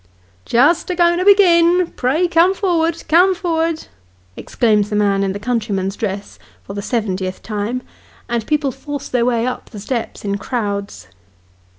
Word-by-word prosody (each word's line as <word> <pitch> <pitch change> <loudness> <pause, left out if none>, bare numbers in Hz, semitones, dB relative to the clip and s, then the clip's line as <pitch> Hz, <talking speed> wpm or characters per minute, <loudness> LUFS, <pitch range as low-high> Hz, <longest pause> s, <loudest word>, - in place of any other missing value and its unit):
*: 90 -1 -35
Just 295 - +3
a 360 - -1
going 345 0 +3
to 365 - -1
begin! 355 -3 +5
Pray 290 +8 +1
come 345 +3 +3
for'erd, 335 -4 0
come 360 +4 +4
for'erd," 330 -3 -1 0.5
exclaims 210 -3 +1
the 210 - -2
man 200 -1 +2
in 195 -1 0
the 195 - -4
countryman's 210 -4 -2
dress, 200 -2 -5 0.2
for 200 - -8
the 200 - -4
seventieth 190 -5 -3
time: 215 +4 -3 0.4
and 235 -2 -2
people 295 -3 0
force 285 +2 -7
their 245 -2 +1
way 235 -2 +1
up 255 - -4
the 210 - -9
steps 230 0 -4
in 200 0 -2
crowds. 200 - -4
245 Hz, 165 wpm, -18 LUFS, 205-335 Hz, 0.5 s, begin